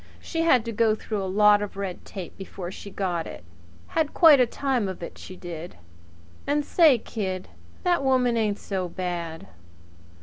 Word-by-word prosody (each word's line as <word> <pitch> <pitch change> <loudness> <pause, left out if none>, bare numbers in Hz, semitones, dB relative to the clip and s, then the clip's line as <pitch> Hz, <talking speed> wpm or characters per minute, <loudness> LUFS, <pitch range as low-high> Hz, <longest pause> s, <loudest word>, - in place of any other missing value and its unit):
She 330 - -3
had 260 -8 +4
to 230 - -3
go 220 0 +2
through 215 -1 -4
a 190 - -3
lot 210 +1 +5
of 205 -1 -5
red 195 -3 -5
tape 185 -4 -8
before 185 -2 -7
she 200 - -9
got 180 -4 -2
it - - -9 0.5
had 315 -2 -1
quite 315 -5 +8
a 250 - +5
time 250 -5 -1
of 185 -2 -7
it, - - -7
she 185 - -9
did! 175 -1 -8 0.7
And 290 0 +1
say, 315 -6 +5
kid, 190 -5 -4 0.3
that 350 -6 +2
woman 255 -3 +3
ain't 215 -3 +1
so 185 -3 -3
bad." 170 -2 -4
205 Hz, 175 wpm, -25 LUFS, 185-255 Hz, 0.7 s, quite